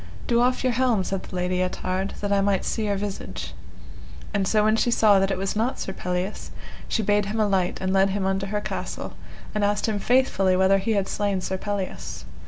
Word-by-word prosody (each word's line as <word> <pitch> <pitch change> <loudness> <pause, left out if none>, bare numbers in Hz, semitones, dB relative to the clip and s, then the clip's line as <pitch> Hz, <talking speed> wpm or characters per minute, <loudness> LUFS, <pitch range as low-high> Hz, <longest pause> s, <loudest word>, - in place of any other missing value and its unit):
Do 235 0 +3
off 250 +1 +2
your 255 -1 +2
helm, 240 -5 +2
said 190 0 -2
the - - -10
Lady 180 0 0
Ettard, 185 +1 -2
that 205 0 0
I 200 - +3
may 195 -1 +2
see 220 - -1
your 205 -1 +1
visage. 200 0 -5 0.8
And 200 -2 +1
so 215 +1 +3
when 215 +1 +4
she 235 - +2
saw 215 -4 +5
that 195 0 +2
it 195 - -1
was 195 +2 -2
not 230 +5 0
Sir 190 - -4
Pelleas, 180 +2 -3 0.4
she 225 - 0
bade 205 0 +2
him 215 +2 -2
alight 195 -4 +1
and 190 0 -1
led 195 0 +4
him 195 0 -1
unto 195 0 0
her 210 +1 -2
castle, - - -5 0.4
and 210 -1 0
asked 205 0 +1
him 215 -2 -1
faithfully 200 -6 +3
whether 190 +1 +4
he 220 +4 0
had 200 -2 +1
slain 205 -2 -1
Sir 190 +1 -3
Pelleas. 200 -2 -4
200 Hz, 215 wpm, -25 LUFS, 190-215 Hz, 0.8 s, saw